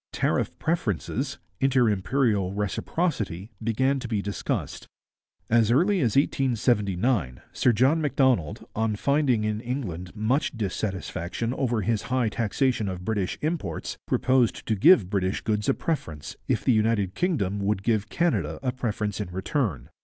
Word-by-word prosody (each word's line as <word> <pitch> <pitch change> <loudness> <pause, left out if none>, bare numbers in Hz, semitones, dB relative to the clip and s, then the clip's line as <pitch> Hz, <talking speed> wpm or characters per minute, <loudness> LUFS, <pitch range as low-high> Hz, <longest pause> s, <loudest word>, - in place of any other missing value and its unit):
Tariff - - 0
preferences, 135 - -1 0.2
inter 130 -3 +3
imperial 105 -2 +1
reciprocity, 105 - -2
began 130 +5 +1
to 125 - -5
be 110 -3 -1
discussed. 100 0 -3 0.6
As 115 -1 +3
early 180 - +3
as 120 -9 +1
1879 115 - +1
Sir 125 - +3
John 130 +8 +3
Macdonald, 130 - +1
on 110 -1 0
finding 140 -2 +2
in 105 0 -1
England 105 -9 -5
much 120 +5 0
dissatisfaction 100 +1 -3
over 120 -5 0
his 110 +1 0
high 130 -3 +2
taxation 115 0 0
of 90 -1 -6
British 100 -4 -1
imports, 150 - -3
proposed 130 -3 +2
to 110 - 0
give 105 - +6
British 95 -1 0
goods 105 +3 0
a 135 - +3
preference 80 - -4
if - - 0
the 130 - +5
United 110 -3 +1
Kingdom 105 - 0
would 100 -1 0
give 110 -2 +1
Canada 100 - 0
a 125 - +1
preference 105 -5 -2
in 100 - -4
return. 95 - -2
110 Hz, 140 wpm, -26 LUFS, 100-130 Hz, 0.6 s, give